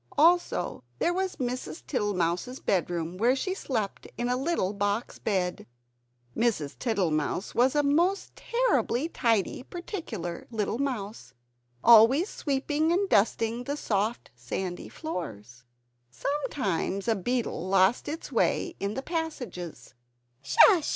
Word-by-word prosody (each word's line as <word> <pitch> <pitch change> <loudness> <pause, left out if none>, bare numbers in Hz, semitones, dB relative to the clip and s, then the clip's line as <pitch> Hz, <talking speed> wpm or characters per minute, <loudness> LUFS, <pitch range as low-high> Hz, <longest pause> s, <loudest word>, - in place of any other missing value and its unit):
Also, 335 - +3
there 345 - +1
was 375 +1 -1
Mrs. 255 +5 -4
Tittle 205 -7 -1
mouse's 180 +9 -1
bedroom, 175 -2 -1
where 240 +6 +3
she 370 +8 -2
slept 225 - -3
in 240 0 -1
a 250 - +2
little 260 - 0
box 205 +2 -2
bed! 185 -4 -1 0.7
Mrs. 215 -12 0
Tittlemouse 180 - 0
was 255 +4 +3
a 295 - +3
most 340 +7 +1
terribly 470 - +1
tidy 230 - +1
particular 260 - -6
little 225 0 -2
mouse, 220 - -4 0.5
always 235 - +7
sweeping 295 +3 0
and 385 +3 +1
dusting 225 - +2
the 285 +2 -2
soft 215 - -1
sandy 175 +10 -5
floors. 125 - -7 0.4
Sometimes 200 - -2
a 225 - +3
beetle 220 -4 -2
lost 195 +4 +3
its 315 +3 -5
way 350 - +1
in 200 +1 -2
the 265 - -3
passages. 250 - -5
230 Hz, 120 wpm, -28 LUFS, 190-290 Hz, 0.7 s, always